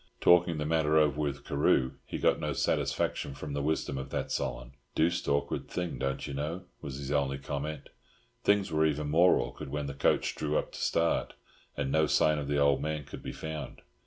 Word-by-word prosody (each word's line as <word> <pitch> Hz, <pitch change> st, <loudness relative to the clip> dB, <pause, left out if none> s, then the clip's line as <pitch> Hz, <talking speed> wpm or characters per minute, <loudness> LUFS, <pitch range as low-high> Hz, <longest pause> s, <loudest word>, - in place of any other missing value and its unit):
Talking 90 Hz, -1 st, +5 dB
the 75 Hz, -, -2 dB
matter 80 Hz, -1 st, +2 dB
over 75 Hz, -2 st, +3 dB
with 70 Hz, -2 st, -3 dB
Carew 65 Hz, -2 st, +2 dB, 0.2 s
he -, -, -4 dB
got -, -, +2 dB
no -, -, -1 dB
satisfaction 70 Hz, -, 0 dB
from 70 Hz, +1 st, -6 dB
the 70 Hz, -, -1 dB
wisdom 70 Hz, -2 st, -1 dB
of 65 Hz, -, -6 dB
that -, -, -3 dB
Solon. -, -, -3 dB, 0.2 s
"Deuced 85 Hz, +2 st, +1 dB
awkward 70 Hz, 0 st, 0 dB
thing, 90 Hz, -1 st, -3 dB
don't 70 Hz, 0 st, -2 dB
you 70 Hz, -, -5 dB
know," 75 Hz, +6 st, -3 dB, 0.2 s
was 70 Hz, -2 st, -6 dB
his 70 Hz, 0 st, -5 dB
only 70 Hz, -2 st, +1 dB
comment. 70 Hz, +2 st, -5 dB, 0.5 s
Things 100 Hz, -3 st, +3 dB
were 80 Hz, 0 st, +2 dB
even 75 Hz, -1 st, -1 dB
more 85 Hz, +4 st, +6 dB
awkward 65 Hz, +4 st, -4 dB
when 75 Hz, +1 st, -3 dB
the 70 Hz, -, -4 dB
coach 70 Hz, -, +1 dB
drew 75 Hz, 0 st, -1 dB
up -, -, -2 dB
to -, -, -8 dB
start, 85 Hz, 0 st, +1 dB, 0.4 s
and 65 Hz, -, -1 dB
no 80 Hz, +1 st, +3 dB
sign 75 Hz, +1 st, +3 dB
of 70 Hz, -, -4 dB
the 70 Hz, 0 st, 0 dB
old 70 Hz, -1 st, +3 dB
man 75 Hz, -1 st, -2 dB
could -, -, -9 dB
be -, -, -5 dB
found. 80 Hz, -3 st, -6 dB
75 Hz, 205 wpm, -30 LUFS, 70-80 Hz, 0.5 s, more